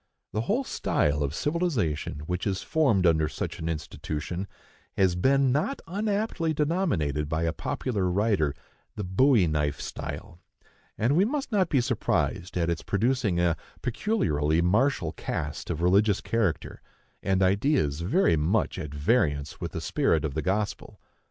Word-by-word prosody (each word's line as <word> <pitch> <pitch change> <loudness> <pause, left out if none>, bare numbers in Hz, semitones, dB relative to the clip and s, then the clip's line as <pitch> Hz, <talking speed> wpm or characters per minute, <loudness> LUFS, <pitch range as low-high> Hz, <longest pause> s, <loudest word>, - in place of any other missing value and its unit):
The 110 - 0
whole 220 - 0
style 75 - 0
of 70 +1 -1
civilization 125 - -1
which 90 +3 -2
is 95 0 -2
formed 130 - +2
under 80 -2 +3
such - - -5
an 80 - -3
institution 80 +3 -4 0.5
has 95 -2 +4
been 135 +8 +3
not 155 - 0
unaptly 200 -3 -1
denominated 135 - 0
by 80 +1 -1
a 80 -1 0
popular 100 0 -2
writer 95 -6 +1 0.4
"the 105 - -4
bowie 105 +3 +4
knife 75 -3 0
style;" 85 - -7 0.6
and 120 +7 +2
we 180 - +5
must 270 +4 -2
not 190 -5 +2
be 135 - +3
surprised 115 -7 -1
at 85 -1 +1
its 85 -2 -1
producing 110 -3 0
a 85 -1 +2 0.3
peculiarly 80 - +1
martial 90 - +2
cast 75 -2 -4
of 85 0 -2
religious 100 +3 +4
character, 110 -8 -1 0.4
and 95 -1 +1
ideas 95 - +2
very 95 - +3
much 85 +7 0
at 75 -5 -5
variance 75 - 0
with - - -4
the - - -3
spirit 80 -2 +1
of 75 - -3
the 80 - -1
gospel. 100 +4 -2
95 Hz, 150 wpm, -27 LUFS, -, 0.6 s, we